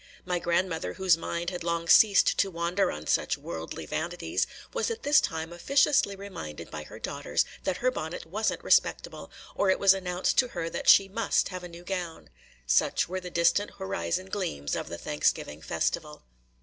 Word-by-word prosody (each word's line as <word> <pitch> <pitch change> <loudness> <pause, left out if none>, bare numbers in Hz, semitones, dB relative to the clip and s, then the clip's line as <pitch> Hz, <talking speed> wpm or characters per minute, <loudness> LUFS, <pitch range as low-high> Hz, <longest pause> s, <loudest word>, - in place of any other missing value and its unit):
My 180 -1 -1
grandmother, 170 -1 -1
whose 190 -3 +3
mind 170 +1 -3
had 180 -2 -5
long 170 0 -1
ceased 200 +2 +6
to 195 - +3
wander 175 +2 0
on 75 +1 -7
such - - +1
worldly 80 0 -6
vanities, 175 - -2 0.3
was 475 -1 0
at 460 0 -5
this 290 +1 +5
time 160 +1 -3
officiously 270 +2 +2
reminded 175 - -8
by 75 -1 -6
her - - -11
daughters - - -1 0.2
that 185 - 0
her 255 - +4
bonnet 160 -7 -5
was 210 +7 -1
n't - - -7
respectable, - - +1 0.2
or 200 - +1
it 190 - +4
was 195 -1 +6
announced 180 -1 0
to 255 - +4
her 170 -7 -4
that - - 0
she 195 - +8
must 215 +3 0
have 185 -1 -7
a - - -6
new 170 +1 -11
gown. 175 - -5 0.3
Such - - +2
were 185 +2 -3
the 180 -1 -7
distant 175 +4 +1
horizon 190 -1 -2
gleams 170 - -3
of - - -4
the - - -5
Thanksgiving 75 +1 -1
festival. - - -2
180 Hz, 185 wpm, -28 LUFS, 165-195 Hz, 0.3 s, she